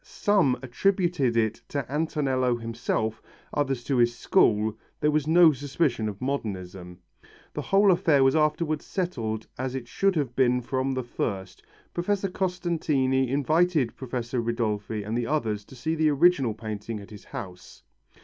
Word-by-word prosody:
Some 190 -11 +2
attributed 165 - +1
it 110 -2 0
to 140 -3 -2
Antonello 135 -4 0
himself, 115 -1 -2 0.3
others 135 -4 -1
to 135 0 0
his 120 0 +3
school, 110 -2 +2 0.2
there 150 - +2
was 150 -1 0
no 165 0 +7
suspicion 135 -4 -1
of 100 -1 -8
modernism. 95 -9 -4 0.6
The - - -3
whole 195 0 +4
affair 165 -6 +3
was 135 +3 +4
afterwards 155 0 +1
settled 115 - -3
as 130 0 -2
it 125 -3 -5
should 195 - +1
have 135 -6 -1
been 125 -1 +3
from 130 +1 -1
the 130 - -2
first. 95 -5 -4 0.3
Professor 195 +2 -1
Costantini 160 -9 0
invited 155 0 +2
Professor 125 -1 -3
Ridolfi 110 -3 -2
and 105 +3 -3
the 120 -1 -1
others 110 -9 -1
to 130 - -14
see 160 +6 -2
the 160 -1 +2
original 145 -6 +3
painting 110 0 -5
at 100 +1 -12
his 105 - -11
house. 95 -10 -9
130 Hz, 150 wpm, -26 LUFS, 115-155 Hz, 0.6 s, no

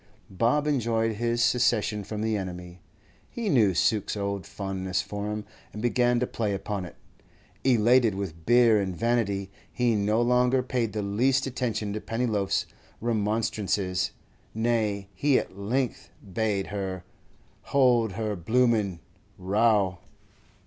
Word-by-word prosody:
Bob 120 +10 +1
enjoyed 115 -6 0
this 120 0 +1
secession 115 -4 +2
from 105 +2 -5
the 110 0 0
enemy. 90 -2 -6 0.5
He 230 -3 -3
knew 110 - +4
Suke's 105 +2 +1
old 100 -1 -3
fondness 95 -2 -3
for 105 0 -5
him, 105 0 -4 0.3
and 105 - -7
began 120 +1 +2
to 125 - +1
play 105 -4 -2
upon 100 -1 -4
it. 85 - -11 0.7
Elated 120 -3 +4
with 85 -5 -6
beer 120 -3 +5
and 95 -3 -3
vanity, 100 -5 0 0.2
he 120 -2 +1
no 105 +2 +1
longer 125 +2 +3
paid 125 -3 -1
the 105 -1 -2
least 125 +7 +1
attention 120 -5 -2
to 105 - -4
Pennyloaf's 115 -4 -1 0.3
remonstrances; 105 -4 0 0.5
nay, 110 -4 0
he 140 +8 +2
at - - -3
length 120 +6 -2 0.2
bade 105 -2 0
her 95 -3 -4 0.6
'hold 120 -6 +3
her 105 +1 -2
bloomin' 105 -2 +1 0.4
row! 100 -1 +2
110 Hz, 130 wpm, -27 LUFS, 100-120 Hz, 0.7 s, beer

